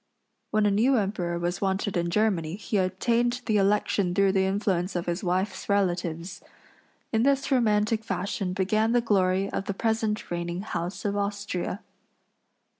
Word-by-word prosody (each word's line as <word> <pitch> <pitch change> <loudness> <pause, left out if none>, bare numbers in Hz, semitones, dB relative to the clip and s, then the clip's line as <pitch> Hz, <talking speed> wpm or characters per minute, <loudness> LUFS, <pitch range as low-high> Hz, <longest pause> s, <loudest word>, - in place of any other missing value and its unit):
When 215 -1 +2
a 205 - +3
new 245 +6 +3
emperor 190 -5 -1
was 175 +1 -2
wanted 195 0 -1
in 170 -1 0
Germany 175 -4 +1
he 205 +1 -2
obtained 235 +7 +1
the 215 -2 +2
election 195 -2 +1
through 195 -1 +4
the 190 0 +2
influence 190 -2 0
of 175 - -1
his 175 +3 -2
wife's 185 +2 -1
relatives. 175 -3 -1 0.7
In 220 - +3
this 275 +2 +2
romantic 220 -3 +2
fashion 195 -3 -2
began 215 +4 +1
the 245 - +4
glory 195 -3 +2
of 195 - -3
the 200 - -3
present 220 -2 -1
reigning 175 +1 -3
house 180 -2 -4
of 200 0 0
Austria. 200 -1 -3
200 Hz, 155 wpm, -27 LUFS, 180-215 Hz, 0.7 s, through